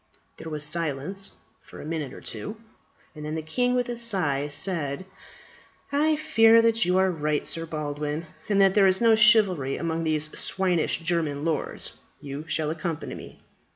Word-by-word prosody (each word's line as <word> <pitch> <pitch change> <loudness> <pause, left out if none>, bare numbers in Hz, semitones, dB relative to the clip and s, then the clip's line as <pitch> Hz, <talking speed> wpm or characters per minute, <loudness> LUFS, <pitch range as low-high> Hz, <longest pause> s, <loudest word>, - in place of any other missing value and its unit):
There 160 - -8
was 150 -1 -3
silence 165 +4 -1 0.3
for - - -13
a - - -8
minute 155 -4 -4
or - - -11
two, 210 +2 -6 0.6
and 150 -2 -9
then 150 +1 -4
the 160 - -4
king 245 +10 0
with 245 -1 0
a 240 - -3
sigh, 185 -12 +1
said, 150 0 0 0.9
"I 305 +2 +2
fear 230 -8 +5
that 230 -2 +3
you 180 +1 +2
are 190 0 +3
right, 150 -3 -1
Sir 165 0 -1
Baldwin, 150 0 -4 0.2
and 200 -1 +2
that 195 -1 +5
there 195 -1 +5
is 190 0 +3
no 230 -1 +5
chivalry 200 - +4
among 165 0 -2
these 155 -1 -1
swinish 180 -4 0
German 160 -3 -1
lords. 165 -2 -3 0.2
You 140 +2 -7
shall 150 0 +1
accompany 160 0 -4
me. - - -11
165 Hz, 170 wpm, -25 LUFS, 150-200 Hz, 0.9 s, fear